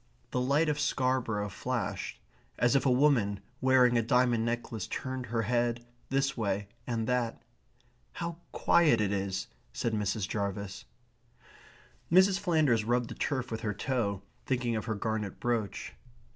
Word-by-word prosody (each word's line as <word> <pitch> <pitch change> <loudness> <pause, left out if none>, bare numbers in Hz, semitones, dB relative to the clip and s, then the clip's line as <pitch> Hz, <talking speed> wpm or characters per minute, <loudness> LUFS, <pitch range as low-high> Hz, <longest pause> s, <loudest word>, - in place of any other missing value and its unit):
The 125 - 0
lights 145 +5 +3
of 150 - -3
Scarborough 130 -7 0
flashed, 120 +3 -3 0.4
as 120 +3 +3
if 140 - +3
a - - +5
woman 125 -7 +3 0.2
wearing 125 -2 +5
a - - +3
diamond 120 0 +3
necklace 115 -3 -3
turned 130 -1 -4
her 115 0 0
head 120 +1 0 0.2
this 135 +1 +1
way 100 -3 -1 0.2
and 115 -2 -1
that. 120 -1 -1 0.7
"How 170 -1 -4
quiet 155 -9 +4
it 100 -2 +1
is!" 95 -1 -1 0.3
said 115 - -1
Mrs. 105 -1 -1
Jarvis. 100 -1 -3 1.3
Mrs. 190 +2 +6
Flanders 155 - +2
rubbed 120 +1 +1
the - - -3
turf 130 -5 -2
with 110 - -3
her 105 -3 -2
toe, 105 -5 -1 0.2
thinking 125 -3 0
of 110 - -2
her 110 -2 -1
garnet 105 -1 -3
brooch. 115 -5 -2
120 Hz, 145 wpm, -30 LUFS, 105-130 Hz, 1.3 s, Mrs